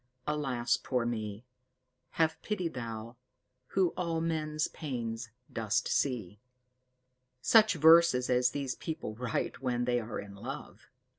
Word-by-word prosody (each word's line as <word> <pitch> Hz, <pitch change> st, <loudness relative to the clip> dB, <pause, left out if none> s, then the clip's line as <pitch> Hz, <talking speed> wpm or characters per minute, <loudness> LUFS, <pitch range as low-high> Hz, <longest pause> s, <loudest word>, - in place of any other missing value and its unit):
Alas, 135 Hz, -6 st, 0 dB
poor 125 Hz, -3 st, -1 dB
me! 110 Hz, -1 st, -3 dB, 0.7 s
Have 160 Hz, -1 st, +2 dB
pity 205 Hz, -5 st, -1 dB
Thou, 115 Hz, -4 st, -6 dB, 0.5 s
who 190 Hz, -2 st, +2 dB
all 165 Hz, -2 st, -2 dB
men's 155 Hz, -2 st, -1 dB
pains 120 Hz, -5 st, -4 dB, 0.2 s
dost 115 Hz, +2 st, 0 dB
see." 110 Hz, -8 st, -1 dB, 1.0 s
Such 220 Hz, -, +5 dB
verses 160 Hz, -5 st, +6 dB
as 125 Hz, 0 st, +3 dB
these 135 Hz, -1 st, -3 dB
people 155 Hz, -9 st, -5 dB
write 120 Hz, +3 st, -3 dB
when 120 Hz, -2 st, 0 dB
they 120 Hz, 0 st, +2 dB
are 115 Hz, 0 st, -5 dB
in 100 Hz, 0 st, -8 dB
love! 100 Hz, -, -8 dB
125 Hz, 125 wpm, -31 LUFS, 115-160 Hz, 1.0 s, verses